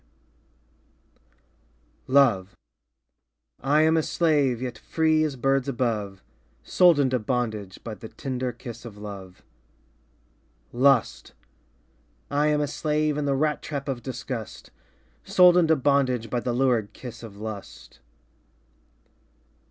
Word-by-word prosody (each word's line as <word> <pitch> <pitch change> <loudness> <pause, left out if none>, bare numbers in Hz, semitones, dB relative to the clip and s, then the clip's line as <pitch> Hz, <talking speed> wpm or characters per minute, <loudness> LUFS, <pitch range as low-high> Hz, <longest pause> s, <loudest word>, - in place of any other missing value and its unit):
P.) - - -18
Love 110 -9 +3 1.1
I 145 +4 +3
am 160 +1 +3
a 160 - +3
slave, 145 -7 +1
Yet 125 -2 -4
free 160 +2 +1
as 150 -3 -2
birds 135 +1 0
above, 110 -7 -2 0.4
Sold 175 -4 +4
into 130 -2 +2
bondage 110 -4 -3
By 115 - -6
the 110 +1 -10
tender 130 -2 -4
kiss 115 -1 -10
of 115 -4 -10
love. 100 -3 -10 1.3
Lust 120 - +2 1.0
I 145 +1 +2
am 150 0 +2
a 145 - 0
slave 150 +1 -1
In 150 0 -2
the 140 -1 +1
rat 150 +2 0
trap 140 -2 -5
of 130 -3 -3
disgust, 125 -3 -7 0.5
Sold 180 -1 +6
into 165 -3 +4
bondage 130 -5 +1
By 125 - 0
the 125 - -2
lurid 120 -5 +1
kiss 125 -3 -9
of 110 -4 -11
lust. 105 -1 -9
130 Hz, 120 wpm, -25 LUFS, 110-145 Hz, 1.3 s, Sold